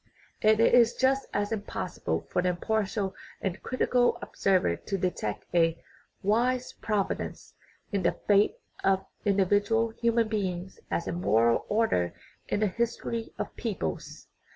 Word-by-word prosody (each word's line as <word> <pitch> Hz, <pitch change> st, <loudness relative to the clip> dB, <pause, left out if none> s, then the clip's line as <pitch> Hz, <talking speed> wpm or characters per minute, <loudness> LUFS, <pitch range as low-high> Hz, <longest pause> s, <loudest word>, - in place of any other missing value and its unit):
And 215 Hz, 0 st, +5 dB
it 230 Hz, -, +5 dB
is 235 Hz, -1 st, +6 dB
just 270 Hz, +1 st, +2 dB
as 205 Hz, +1 st, -1 dB
impossible 210 Hz, -2 st, -3 dB
for -, -, +2 dB
the 180 Hz, -, +1 dB
impartial 200 Hz, +1 st, -1 dB, 0.3 s
and 190 Hz, 0 st, -3 dB
crit 255 Hz, -, -5 dB
ical 245 Hz, -1 st, +3 dB
observer 185 Hz, -, +1 dB
to 195 Hz, -, -4 dB
detect 175 Hz, -, -2 dB
a 165 Hz, -1 st, +3 dB, 0.2 s
" -, -, -34 dB, 0.2 s
wise 245 Hz, +5 st, +1 dB
providence 210 Hz, -3 st, -3 dB, 0.2 s
" -, -, -38 dB
in 200 Hz, -, +1 dB
the 170 Hz, -, +2 dB
fate 205 Hz, -, +4 dB, 0.3 s
of 190 Hz, 0 st, +2 dB, 0.2 s
individual 205 Hz, +3 st, +3 dB
human 230 Hz, 0 st, +1 dB
beings 190 Hz, -4 st, -3 dB
as 170 Hz, -, -1 dB
a -, -, -1 dB
moral 115 Hz, -, +2 dB
order 205 Hz, -, +1 dB, 0.3 s
in 205 Hz, -, -1 dB
the 215 Hz, -, +4 dB
his 235 Hz, +4 st, -1 dB
tory 230 Hz, -1 st, -4 dB
of -, -, -5 dB
peoples. 190 Hz, -, -4 dB
205 Hz, 155 wpm, -28 LUFS, 180-230 Hz, 0.3 s, is